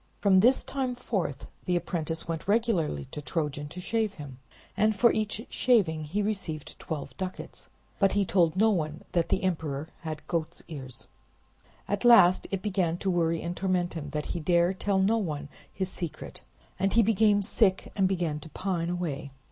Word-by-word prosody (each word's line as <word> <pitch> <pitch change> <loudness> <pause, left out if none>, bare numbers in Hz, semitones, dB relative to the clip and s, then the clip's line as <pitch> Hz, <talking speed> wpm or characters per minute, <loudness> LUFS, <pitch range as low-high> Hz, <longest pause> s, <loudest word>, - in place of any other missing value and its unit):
From 195 -2 +5
this 245 +7 +5
time 260 -2 -2
forth 190 - -3 0.2
the 180 - +1
apprentice 165 -2 -2
went 165 +1 -4
regularly 200 - +1
to 150 - -5
Trojan 150 -2 -2
to 175 - -9
shave 215 +2 -1
him, 140 -6 -10 0.4
and 215 +1 +3
for 235 +3 +5
each 215 +1 -2
shaving 180 -11 +2
he 200 +8 -1
received 190 -8 -4
twelve 155 -3 -5
ducats; 185 -1 -6 0.3
but 195 -2 +4
he 200 -1 +2
told 170 -4 +3
no 220 +3 +4
one 155 -4 -2
that 170 -2 +1
the - - +1
emperor 160 -4 -2
had 155 -2 -6
goat's 165 -3 -3
ears. 135 -6 -8 0.8
At 205 0 -1
last 230 -7 +7
it 195 -1 -3
began 185 -5 0
to 190 +1 -1
worry 165 -2 +1
and 170 +1 -3
torment 185 -2 0
him 155 -3 -5
that 150 +1 -3
he 175 - -2
dare 175 +2 +3
tell 195 +1 0
no 205 +4 +3
one 150 -7 -4 0.2
his 190 -1 -3
secret; 170 -4 -6 0.4
and 195 +1 +1
he 230 - +6
became 210 -1 +3
sick 195 -2 +1
and 195 -2 +3
began 170 -5 -1
to 160 - -11
pine 175 -1 -2
away. 165 -6 -3
180 Hz, 180 wpm, -28 LUFS, 160-200 Hz, 0.8 s, last